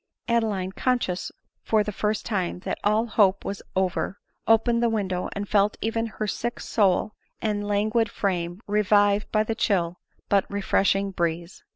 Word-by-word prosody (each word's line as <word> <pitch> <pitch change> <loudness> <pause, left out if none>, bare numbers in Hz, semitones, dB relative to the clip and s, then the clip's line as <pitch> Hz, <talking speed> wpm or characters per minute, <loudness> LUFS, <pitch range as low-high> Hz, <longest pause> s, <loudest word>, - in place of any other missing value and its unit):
Adeline, 215 -6 0
conscious 235 -5 -1 0.3
for 215 -1 +2
the 210 - -4
first 210 +1 -1
time 190 -7 -1
that - - -3
all 215 +2 +2
hope 200 -4 +2
was 195 - -4
over, 190 +1 -1 0.3
opened 230 +1 +4
the 235 - +3
window, 190 -5 -1
and 200 0 -4
felt 205 0 +2
even 225 +1 -1
her 215 0 -4
sick 235 +3 -3
soul 205 0 +1 0.3
and 205 -2 -1
languid 215 +2 +1
frame 175 -2 -2
revived 205 0 +2
by 215 0 +3
the 225 - -2
chill 180 -5 0 0.3
but 200 -1 +2
refreshing 195 0 +1
breeze. 170 0 -3
205 Hz, 155 wpm, -25 LUFS, 190-220 Hz, 0.3 s, opened